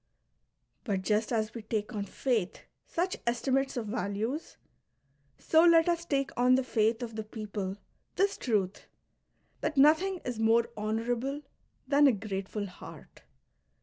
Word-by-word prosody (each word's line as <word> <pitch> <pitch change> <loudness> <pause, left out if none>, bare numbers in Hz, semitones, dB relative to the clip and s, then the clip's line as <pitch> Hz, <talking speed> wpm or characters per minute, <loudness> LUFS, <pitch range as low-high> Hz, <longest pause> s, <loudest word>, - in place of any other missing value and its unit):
But 195 -6 -2
just 215 +3 +1
as 220 -2 0
we 230 - -6
take 215 +1 -3
on 205 -2 -3
faith 215 -2 -1 0.3
such 360 +2 -1
estimates 265 +3 0
of 235 - -2
values, 220 +6 -3 0.8
so 320 +1 +4
let 335 -1 +6
us 340 -1 0
take 275 -4 0
on 250 +1 +4
the 260 - +1
faith 225 -1 +1
of 230 -2 -6
the 220 - -3
people 210 -3 -5 0.4
this 395 +1 +2
truth, 205 -5 -1 0.7
that 305 - -2
nothing 320 +7 +5
is 245 -3 -3
more 225 +1 +4
honourable 235 +6 -2 0.4
than 285 +1 +5
a 265 - +5
grate 195 -2 -4
ful 210 -2 -3
heart. 185 -1 -12
235 Hz, 145 wpm, -30 LUFS, 215-275 Hz, 0.8 s, let